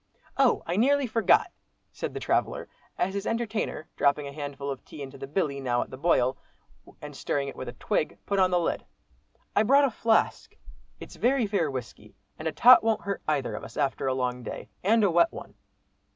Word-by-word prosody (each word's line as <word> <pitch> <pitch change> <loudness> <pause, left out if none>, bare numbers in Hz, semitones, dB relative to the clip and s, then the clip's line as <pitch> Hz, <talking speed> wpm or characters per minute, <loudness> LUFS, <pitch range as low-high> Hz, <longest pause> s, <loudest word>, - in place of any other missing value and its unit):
"Oh! 270 -2 +3
I 175 +2 -2
nearly 280 +5 +3
forgot," 225 -1 +3 0.4
said - - -5
the - - -2
traveller, - - -1 0.3
as 190 +2 0
his 200 +1 -3
entertainer, 225 -8 -2
dropping 145 +1 +2
a 140 - -7
handful 140 -1 -5
of 135 - -7
tea 145 - -9
into 135 0 -10
the 135 - -6
"billy," 145 -3 -1
now 125 -2 0
at - - -17
the - - -6
boil, 130 -4 +2 0.6
and - - -8
stirring 140 -1 -2
it 140 - -7
with 130 - -6
a - - -8
twig, 155 - -2
put 200 -1 0
on 185 -1 +4
the 180 -1 +2
lid. 170 - -1 0.7
"I - - +5
brought 275 +6 +5
a 270 - 0
flask, 230 - 0 0.4
it's - - -11
very 255 0 +2
fair 200 -7 0
whisky, 120 -5 -8 0.2
and 155 - -3
a - - 0
tot 245 +8 +7
won't 225 -1 +1
hurt 200 -1 -3
either 140 -7 0
of - - -6
us, 115 - -10
after 140 -2 0
a 130 - +1
long 125 -1 -2
day - - -7
and 220 +3 +4
a 200 - +3
wet 175 - +4
one." - - -10
165 Hz, 210 wpm, -27 LUFS, 135-220 Hz, 0.7 s, tot